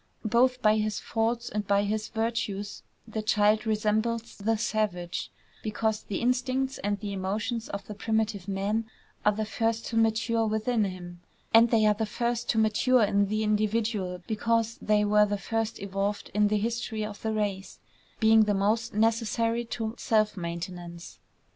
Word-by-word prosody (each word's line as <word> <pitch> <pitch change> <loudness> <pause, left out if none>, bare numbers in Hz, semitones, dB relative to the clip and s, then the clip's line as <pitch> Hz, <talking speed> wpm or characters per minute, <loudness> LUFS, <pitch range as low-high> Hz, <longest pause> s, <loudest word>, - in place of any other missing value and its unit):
Both 250 +3 +2
by 215 0 +5
his 215 -1 -1
faults 230 +1 -1
and 210 -1 -3
by 200 0 +3
his 215 +1 -2
virtues 220 -3 -3 0.3
the 220 -1 -3
child 215 0 +2
resembles 220 +2 0
the 220 +2 0
savage, 205 -6 -2 0.3
because 215 0 -1
the 195 - -4
instincts 255 +2 0
and 205 +1 -1
the 205 -1 -4
emotions 210 +5 -3
of 200 0 -5
the 210 - -7
primitive 215 -2 -1
man 205 +3 -1 0.3
are 210 - +5
the 215 +1 -2
first 225 +1 -1
to 230 - -4
mature 225 0 +2
within 220 +1 +1
him; 175 -2 -7 0.3
and 230 +1 +7
they 220 -2 +3
are 210 - +5
the 220 +1 -2
first 235 +2 -2
to 225 - +1
mature 220 +3 +3
in 200 0 +2
the 215 +2 -1
individual 210 -3 0
because 230 +1 0
they 210 0 +2
were 210 0 +4
the 205 0 -1
first 225 +3 -2
evolved 200 +1 -3
in 210 0 +3
the 210 +1 +1
history 225 0 -2
of 210 -1 -8
the 220 - -1
race, 205 -3 -2 0.4
being 220 -1 +6
the 205 -1 +1
most 210 +3 0
necessary 230 +1 +1
to 225 -1 -4
self 215 -2 +2
maintenance. 170 -1 -6
215 Hz, 165 wpm, -28 LUFS, 205-225 Hz, 0.4 s, and